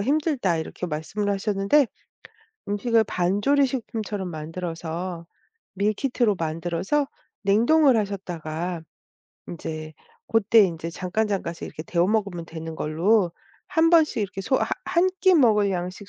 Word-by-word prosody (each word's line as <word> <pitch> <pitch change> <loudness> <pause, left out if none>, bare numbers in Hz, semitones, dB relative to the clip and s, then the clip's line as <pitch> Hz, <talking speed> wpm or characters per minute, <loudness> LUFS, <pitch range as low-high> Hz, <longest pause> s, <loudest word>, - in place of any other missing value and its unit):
힘들다." 270 - +1
이렇게 180 +2 -5
말씀을 170 +7 -3
하셨는데 200 +7 +2 0.8
음식을 225 +2 +2
반조리 205 +12 +2
식품처럼 215 -6 -4
만들어서 165 +2 -5 0.5
밀키트로 215 +2 +1
만들어서 170 - -1 0.4
냉동을 240 +6 +4
하셨다가 175 -4 -3 0.7
인제 155 -2 -6 0.3
고때 225 -1 +5
인제 165 -2 -3
잠깐잠깐씩 185 -1 -2
이렇게 155 - -8
데워 170 +1 +1
먹으면 200 -5 -1
되는 160 -1 -7
걸로 175 +4 +2 0.4
한번씩 325 -4 +4
이렇게 195 0 -4
소 260 - 0
하 - - 0 0.2
한 350 +2 +2
끼 375 -1 +5
먹을 215 -8 +4
양씩 185 +3 -5
195 Hz, 295 characters per minute, -24 LUFS, 170-225 Hz, 0.8 s, 고때